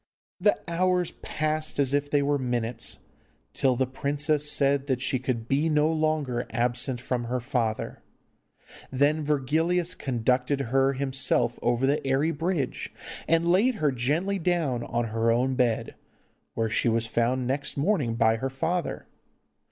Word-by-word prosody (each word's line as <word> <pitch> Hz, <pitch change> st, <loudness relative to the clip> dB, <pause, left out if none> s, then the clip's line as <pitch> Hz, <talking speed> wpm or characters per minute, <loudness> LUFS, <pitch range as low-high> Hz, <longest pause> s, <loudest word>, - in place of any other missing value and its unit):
The 205 Hz, -, +3 dB
hours 180 Hz, +1 st, +1 dB
passed 155 Hz, 0 st, -1 dB
as 140 Hz, -1 st, +1 dB
if 145 Hz, 0 st, 0 dB
they 145 Hz, -1 st, +2 dB
were 145 Hz, 0 st, +1 dB
minutes, 120 Hz, -2 st, -2 dB, 0.5 s
till 130 Hz, -2 st, +2 dB
the 130 Hz, +2 st, +1 dB
princess 145 Hz, +3 st, 0 dB
said 140 Hz, 0 st, +2 dB
that 130 Hz, -3 st, 0 dB
she 130 Hz, 0 st, 0 dB
could 120 Hz, -3 st, -3 dB
be 145 Hz, +5 st, +1 dB
no 155 Hz, +1 st, +2 dB
longer 155 Hz, -6 st, -1 dB
absent 125 Hz, +2 st, 0 dB
from 125 Hz, -1 st, -2 dB
her 125 Hz, +2 st, -1 dB
father. 120 Hz, -4 st, -2 dB, 0.9 s
Then 145 Hz, +4 st, +2 dB
Virgilius 160 Hz, +5 st, +1 dB
conducted 125 Hz, 0 st, 0 dB
her 135 Hz, +1 st, +2 dB
himself 135 Hz, 0 st, 0 dB
over 120 Hz, +2 st, +1 dB
the 140 Hz, +2 st, +1 dB
airy 135 Hz, +4 st, +1 dB
bridge, 165 Hz, -3 st, -2 dB, 0.4 s
and 165 Hz, +1 st, +3 dB
laid 225 Hz, +8 st, +3 dB
her 150 Hz, -8 st, +1 dB
gently 155 Hz, +11 st, 0 dB
down 165 Hz, -8 st, 0 dB
on 120 Hz, -1 st, -2 dB
her 115 Hz, 0 st, +1 dB
own 125 Hz, +3 st, +2 dB
bed, 125 Hz, -3 st, 0 dB, 0.6 s
where 115 Hz, 0 st, 0 dB
she 115 Hz, +2 st, +1 dB
was 115 Hz, 0 st, +1 dB
found 120 Hz, +3 st, 0 dB
next 140 Hz, +3 st, -2 dB
morning 145 Hz, -, +1 dB
by 115 Hz, -1 st, +3 dB
her 135 Hz, +4 st, -2 dB
father. 165 Hz, +6 st, -2 dB
135 Hz, 150 wpm, -26 LUFS, 125-155 Hz, 0.9 s, The